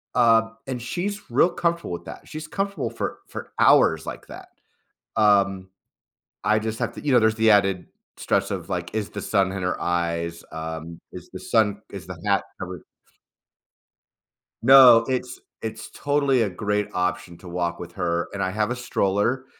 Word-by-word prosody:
Um, 115 -2 +3
and 130 -2 -4
she's 195 - -4
real 150 +9 +4
comfortable 170 - -1
with 85 - -6
that. - - -10
She's 155 0 -7
comfortable 200 0 -2
for - - -4
for - - -8
hours 80 -1 +5
like - - -7
that. - - -11 0.7
Um, 100 -3 +3 0.7
I 110 0 +3
just 110 0 -4
have 120 -1 -1
to - - -8
you 145 - +1
know, 125 - +7
there's 110 0 +2
the 110 0 +4
added 95 -3 +2 0.3
stress - - 0
of, - - -4
like, - - -4
is 110 -2 -2
the 105 - -6
sun 95 -3 +1
in 95 -1 -4
her 90 0 -2
eyes, 85 -1 -2
um, 80 +1 -6
is - - -10
the - - -7
sun 105 -2 +1
is 95 -5 -8
the 95 -3 -8
hat 100 -1 +2 0.2
covering 90 -3 -6 1.8
No, 125 -3 +8
it's 125 -1 -3 0.2
it's 110 0 -6
totally 140 -3 +1
a 105 - -1
great 105 +2 -1
option 90 -1 -2
to 95 - -13
walk 85 0 -2
with - - -8
her, 85 0 -1
and 100 - -4
I 95 - 0
have 105 +3 -1
a - - -1
stroller, 120 +1 0
105 Hz, 175 wpm, -24 LUFS, 90-120 Hz, 1.8 s, No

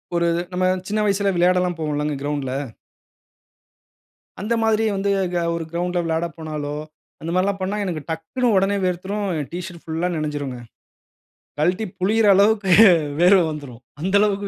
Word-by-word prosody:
ஒரு 170 0 +2 0.3
நம்ம 185 0 +1 0.2
சின்ன 215 +1 -1
வயசுல 200 0 +1
விளையாடல்லாம் 180 0 +2
போவோம்ல்லங்க 150 -1 -1
கிரவுண்ட்ல. 145 -3 -2 1.9
அந்த 220 +3 -1
மாதிரி 220 0 +2
வந்து 200 +1 -1 0.2
க - - +1 0.2
ஒரு 165 - -3
கிரவுண்ட்ல 175 +1 -1
விளையாட 165 +1 0
போனாலோ, 150 -2 -5 0.5
அந்த 165 - -5
மாதிரில்லாம் 190 +1 0
பண்ணா 195 +3 -2
எனக்கு 165 -5 -3
டக்குனு 160 +11 -2
உடனே 195 +1 +2
வேர்த்துரும். 195 +3 -2
ஏ - - -2
டிஷர்ட் 175 -1 -7
புல்லா 165 +2 -2
நனஞ்சுடுங்க. 145 -5 -4 1.0
கல்ட்டி 180 +7 +1
புளியற 210 +3 +2
அளவுக்கு 200 -1 +3 0.5
வேர்வை 180 0 +6
வந்துரும். 130 -5 -9 0.2
அந்த 190 +3 0
அளவிற்கு 200 -1 0
180 Hz, 135 wpm, -22 LUFS, 160-200 Hz, 1.9 s, வேர்வை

